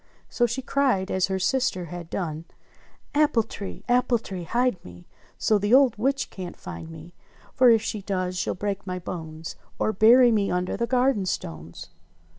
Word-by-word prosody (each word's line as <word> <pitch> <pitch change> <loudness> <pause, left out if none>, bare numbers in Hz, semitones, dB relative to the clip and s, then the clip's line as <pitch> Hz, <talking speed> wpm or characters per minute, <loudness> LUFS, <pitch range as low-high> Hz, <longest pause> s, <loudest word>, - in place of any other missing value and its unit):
So 240 - +2
she 250 +3 -4
cried 255 -9 +1
as 190 -1 +1
her 190 -1 -1
sister 190 -2 0
had 170 0 -8
done: 160 -3 -4 0.7
"Apple 290 -6 +3
tree! 205 -2 -8
Apple 245 0 +3
tree, 190 -6 -7
hide 240 -2 0
me 90 0 -13 0.3
So 215 -2 +2
the 205 +5 +3
old 265 -4 +5
witch 270 +5 -1
can't 180 -2 -7
find 160 - -8
me, 165 +1 -11 0.4
For 255 -1 +5
if 225 -2 +4
she 215 -2 -3
does 185 -2 -2
she'll 180 - -2
break 200 +1 -4
my 180 0 -3
bones, 160 -2 -7 0.2
Or 215 - 0
bury 235 +4 +6
me 205 -3 +1
under 180 0 -1
the 235 +2 -1
garden 250 -6 +1
stones." 80 - -6
200 Hz, 175 wpm, -25 LUFS, 180-240 Hz, 0.7 s, bury